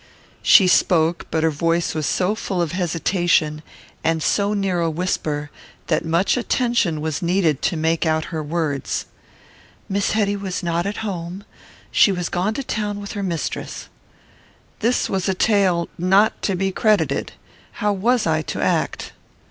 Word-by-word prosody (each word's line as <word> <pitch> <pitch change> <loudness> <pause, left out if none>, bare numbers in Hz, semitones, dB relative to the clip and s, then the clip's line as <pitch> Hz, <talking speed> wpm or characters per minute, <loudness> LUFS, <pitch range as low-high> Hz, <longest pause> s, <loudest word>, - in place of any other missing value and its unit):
She 190 - +6
spoke, 170 -2 +2
but 160 -1 0
her 160 - +3
voice 165 +3 0
was 155 -2 -2
so 185 +2 +1
full 195 -4 -3
of 170 -3 0
hesitation, 170 -3 +1 0.4
and 160 -1 +1
so 205 +1 +1
near 195 -3 0
a 165 - +1
whisper, 155 -3 -2 0.4
that 155 - +1
much 170 +8 +1
attention 235 - 0
was 155 -2 -2
needed 170 -5 +1
to 175 - 0
make 160 +1 +1
out 160 -1 +1
her 160 - -2
words: 150 -3 -2 0.8
Miss 200 +1 0
Hetty 205 -2 +1
was 195 -2 -4
not 170 +2 0
at 205 - -4
home; 185 0 -5 0.5
she 200 - +5
was 180 -2 -2
gone 190 +5 -1
to 275 - -3
town 210 -4 -3
with 200 0 -7
her 205 - -4
mistress. 170 -5 -4 0.9
This 235 +3 +1
was 190 0 -1
a 190 - +1
tale 185 -4 +2
not 195 +5 +3
to 195 - 0
be 190 +1 0
credited. 185 - +1 0.4
How 210 0 0
was 230 +4 +1
I 160 -1 +1
to - - -5
act? - - -1
180 Hz, 160 wpm, -21 LUFS, 160-200 Hz, 0.9 s, She